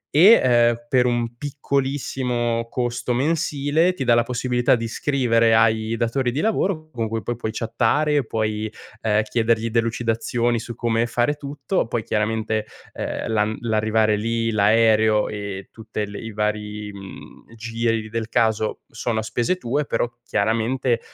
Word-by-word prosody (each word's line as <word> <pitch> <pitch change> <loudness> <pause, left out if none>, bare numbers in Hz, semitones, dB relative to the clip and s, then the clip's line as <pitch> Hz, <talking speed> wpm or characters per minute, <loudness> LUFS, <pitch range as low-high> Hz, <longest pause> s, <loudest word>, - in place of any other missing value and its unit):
e, 195 +9 +8
ehm, 120 -2 +4
per 125 -1 +3
un 120 -1 -1
piccolissimo 130 -4 -1
costo 120 0 -2
mensile 150 +4 +1
ti 135 - -3
dà 120 - +4
la 120 - +5
possibilità 125 0 +1
di 115 -1 -3
scrivere 115 -3 +2
ai 110 0 +2
datori 120 +2 0
di 135 - -3
lavoro 185 -6 0
con 115 -4 -2
cui 115 -1 -3
poi 120 - -2
puoi 110 -1 -4
chattare, 125 +6 +1
puoi 110 -1 -2 0.3
ehm 110 -1 +2
chiedergli 115 0 0
delucidazioni 115 0 0
su 120 0 -7
come 115 0 0
fare 120 +5 +1
tutto, 145 - -3
poi 115 -1 -2
chiaramente, 110 0 -1 0.3
ehm, - - -4
l'an 110 0 +1
l'arrivare 110 -1 +2
lì, 115 +2 -1
l'aereo 110 0 +3
e 100 -2 -6
tutte 110 -1 -5
le 100 0 -8
i 115 - -7
vari, 105 0 -3
mhmm, 100 +3 -12
giri 115 -1 -2
del 115 0 -3
caso 110 -2 +1
sono 115 0 -3
a - - -3
spese 120 +11 -1
tue, 145 0 -1
però 115 - 0 0.2
chiaramente, 115 +2 0
115 Hz, 150 wpm, -22 LUFS, 110-125 Hz, 0.3 s, e